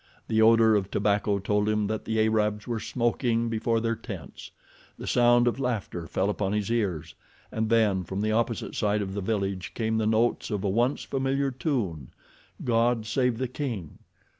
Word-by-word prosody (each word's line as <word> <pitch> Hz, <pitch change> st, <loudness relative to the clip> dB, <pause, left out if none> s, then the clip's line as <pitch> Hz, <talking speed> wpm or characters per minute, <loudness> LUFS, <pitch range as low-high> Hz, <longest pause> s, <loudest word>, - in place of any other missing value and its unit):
The 110 Hz, 0 st, +3 dB
odor 110 Hz, 0 st, +6 dB
of 100 Hz, -2 st, 0 dB
tobacco 100 Hz, 0 st, +1 dB
told 105 Hz, +1 st, 0 dB
him 105 Hz, -1 st, +1 dB
that 110 Hz, +1 st, -3 dB
the 110 Hz, 0 st, -1 dB
Arabs 105 Hz, -1 st, +1 dB
were 115 Hz, -2 st, -2 dB
smoking 120 Hz, 0 st, 0 dB
before 115 Hz, 0 st, 0 dB
their 115 Hz, 0 st, 0 dB
tents. -, -, -9 dB, 0.5 s
The -, -, -8 dB
sound 120 Hz, 0 st, +4 dB
of 120 Hz, -, 0 dB
laughter 110 Hz, -9 st, -3 dB
fell 95 Hz, -, 0 dB
upon 100 Hz, -1 st, -2 dB
his 105 Hz, +1 st, -1 dB
ears, 100 Hz, -10 st, -1 dB, 0.4 s
and 110 Hz, 0 st, -1 dB
then 105 Hz, -5 st, +3 dB
from 95 Hz, +3 st, -4 dB
the 110 Hz, +1 st, 0 dB
opposite 115 Hz, +1 st, -1 dB
side 105 Hz, -1 st, 0 dB
of 95 Hz, -1 st, -5 dB
the 100 Hz, -, -3 dB
village 95 Hz, -2 st, -2 dB
came 110 Hz, -1 st, 0 dB
the 110 Hz, -, +1 dB
notes 110 Hz, +2 st, +1 dB
of 105 Hz, -3 st, -2 dB
a 100 Hz, -, +1 dB
once 120 Hz, +7 st, +1 dB
familiar 135 Hz, 0 st, -1 dB
tune: 115 Hz, -, -2 dB, 0.6 s
God 115 Hz, -1 st, +2 dB
Save 125 Hz, +1 st, +1 dB
the 130 Hz, +1 st, -1 dB
King. 120 Hz, -, -5 dB
110 Hz, 180 wpm, -27 LUFS, 105-120 Hz, 0.6 s, odor